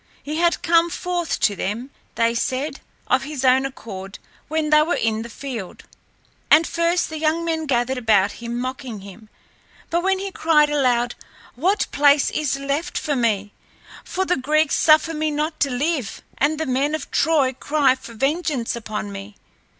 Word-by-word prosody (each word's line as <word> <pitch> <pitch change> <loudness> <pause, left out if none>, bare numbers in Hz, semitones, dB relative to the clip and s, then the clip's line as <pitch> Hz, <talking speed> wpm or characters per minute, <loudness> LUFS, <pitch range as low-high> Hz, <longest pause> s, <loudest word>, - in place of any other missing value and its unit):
He 300 +2 -4
had 340 0 +1
come 335 0 +4
forth 350 -1 -2
to 210 -2 +3
them, 225 +8 -4 0.2
they 230 0 +2
said, 260 +5 -2 0.3
of 255 +1 +2
his 275 -1 -4
own 260 +1 +4
accord 195 -7 -9 0.3
when 310 0 -1
they 305 0 +7
were 325 +3 +1
in 220 -1 0
the 235 - -7
field. 235 -6 -7 0.7
And 320 +2 +6
first 335 +2 +1
the 315 - -5
young 320 +2 +1
men 320 -2 -2
gathered 255 0 0
about 210 -4 +3
him 235 0 -4
mocking 255 -4 -5
him, 200 +3 -13 0.6
but 340 +1 +2
when 385 +1 +1
he 390 +1 -5
cried 300 -4 +3
aloud, 245 -4 +2 0.4
"What 370 - +1
place 285 0 +4
is 300 -3 -1
left 280 +4 -2
for 295 -2 -1
me, 210 -5 0 0.5
for 380 +1 -2
the 360 - +1
Greeks 305 +3 +1
suffer 310 +1 +4
me 310 0 -1
not 305 +2 -2
to 280 - +2
live 270 -2 -2 0.2
and 300 +2 +2
the 320 - -1
men 275 +3 0
of 310 - -7
Troy 290 -5 +2
cry 285 0 +2
for 255 -3 -11
vengeance 275 -1 -1
upon 215 -3 -5
me?" 200 +1 -9
280 Hz, 175 wpm, -22 LUFS, 235-315 Hz, 0.7 s, they